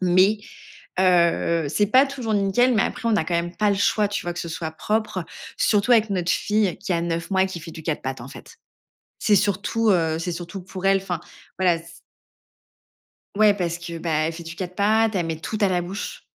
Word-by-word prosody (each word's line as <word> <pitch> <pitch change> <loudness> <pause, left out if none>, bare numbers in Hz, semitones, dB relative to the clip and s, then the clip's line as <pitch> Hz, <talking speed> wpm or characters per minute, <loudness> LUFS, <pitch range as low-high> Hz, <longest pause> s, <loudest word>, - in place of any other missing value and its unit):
Mais 185 +3 +4 0.6
heu, 170 -3 +3
c'est 205 +8 +2
pas 260 +5 +5
toujours 255 -5 -3
nickel, 205 +6 +3
mais 215 - +3
après, 230 - -2
on - - +2
n'a 195 -7 +2
quand 175 - -2
même 175 +1 -1
pas 210 -1 +2
le - - +2
choix, 205 +1 +2
tu 205 - -3
vois? 175 - -3
Que 175 - -8
ce 170 - -5
soit 160 0 -4
propre, 210 +1 -2 0.3
surtout 210 +3 +2
avec 225 -2 +4
notre 180 -2 0
fille 210 -3 +1
qui 185 - -3
a 170 - +1
9 170 +1 -3
mois 190 0 +4
et - - 0
qui 185 -2 -6
fait 165 +1 -9
du 160 - -9
4 155 -3 -1
pattes 130 -2 -4
en 120 - -8
fait. - - -13 0.6
C'est 210 - +3
surtout, 205 +3 +1
heu, 165 -4 +2
c'est 175 +1 -3
surtout 175 +3 -6
pour 190 0 -9
elle. 195 0 +5
Enfin, 185 -3 -4 0.4
voilà, 180 -3 +3
c 170 0 -14 1.5
Ouais, 215 -1 +6
parce 175 -4 -2
que, 170 -1 -7
ben, 165 0 -4 0.2
elle 165 - -3
fait 170 +1 -8
du 165 +1 -8
4 180 0 -6
pattes, 220 +2 +2
elle 175 -3 0
met 160 -1 -3
tout 215 - -4
à 200 - +5
la 180 -1 +1
bouche. 200 - -6
185 Hz, 230 wpm, -23 LUFS, 170-210 Hz, 1.5 s, Ouais